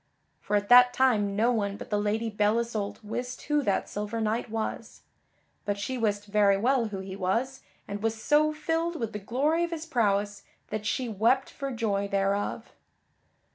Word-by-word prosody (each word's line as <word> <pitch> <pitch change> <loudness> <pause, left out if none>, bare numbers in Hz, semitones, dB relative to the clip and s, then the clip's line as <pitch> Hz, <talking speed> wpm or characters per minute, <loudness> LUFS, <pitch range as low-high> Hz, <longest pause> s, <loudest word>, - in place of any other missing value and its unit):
For 210 - -2
at 205 0 +1
that 245 0 +8
time 210 -6 +2
no 230 +4 +3
one 205 -4 -1
but - - -10
the 210 - +2
Lady 220 +2 -1
Belle 210 +1 +2
Isoult 225 -3 -3
wist 245 +4 -5
who 295 0 +1
that 200 -8 0
silver 210 +2 -4
knight 225 +2 -1
was. 220 0 -4 0.6
But 205 -1 -2
she 235 +6 -3
wist 205 -4 -1
very 205 -1 +3
well 245 +3 +2
who 200 -3 -5
he 190 0 -7
was, 230 +8 -1 0.3
and 200 0 -5
was 225 0 -1
so 305 +4 +3
filled 325 +2 -1
with 225 -2 -3
the 210 - -4
glory 280 - 0
of 340 - -1
his 330 -1 -5
prowess 205 -7 0 0.3
that 215 0 -3
she 255 +3 -1
wept 230 +5 +1
for 275 -1 -5
joy 210 -5 -1
thereof. 200 0 -1
220 Hz, 180 wpm, -28 LUFS, 205-250 Hz, 0.6 s, that